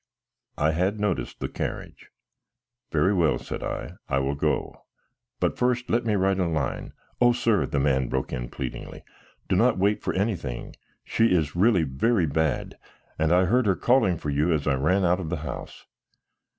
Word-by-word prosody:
I 75 +2 +2
had 95 +6 0
noticed 105 -4 -2
the - - -2
carriage. - - -6 0.8
"Very 95 - +3
well," 85 -9 +2
said - - -6
I. - - -5
"I 65 - +1
will 70 +1 0
go, 70 - -2 0.6
but - - 0
first 125 0 0
let 120 0 +1
me 110 -2 +1
write 95 0 +1
a 90 - +1
line 80 -3 -3
" - - -38
"O 120 0 +6
sir," 115 -3 +1
the 70 - -1
man 65 -2 +1
broke 65 0 -2
in - - -4
pleadingly, 65 -2 -7 0.4
"do - - +1
not - - +3
wait 100 +2 +1
for - - -2
anything. 90 - -3 0.3
She 115 - +2
is 80 -7 +1
really 95 -1 +4
very 85 - +1
bad, 80 -1 -1 0.4
and 80 +1 +2
I 90 +1 +5
heard 120 +4 +2
her 95 - +3
calling 120 -8 +3
for 75 - -4
you 75 +5 +1
as 75 -3 0
I 70 - +2
ran 90 +9 +2
out 90 +1 +2
of 85 -4 -4
the 90 - -2
house." - - -7
90 Hz, 185 wpm, -25 LUFS, 75-105 Hz, 0.8 s, O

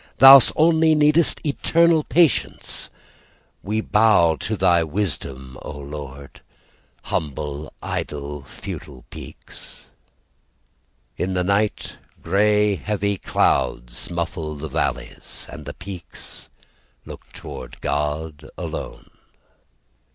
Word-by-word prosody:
"Thous 135 +1 +10
only 160 0 +4
needest 150 +2 +4
eternal 165 +2 +3
patience; 165 -3 +1 0.7
"We 110 +3 -1
bow 105 -7 +4
to 110 +6 -3
Thy 90 -2 +4
wisdom, 70 -7 -4
O 75 - -7
Lord 70 -1 -9 0.6
"Humble, 75 0 -4
idle, 75 -1 -4
futile 65 0 -9
peaks." - - -12 1.3
In 95 +1 -2
the 90 - +1
night 100 +3 0 0.3
Grey 105 +2 +3
heavy 100 0 -1
clouds - - 0
muffles 80 -3 -4
the 80 - -5
valleys, - - -4
And - - -9
the - - -7
peaks 90 -1 -10 0.6
looked - - -12
toward - - -9
God 75 +1 -3
alone. - - -6
90 Hz, 95 wpm, -22 LUFS, 75-110 Hz, 1.3 s, Thous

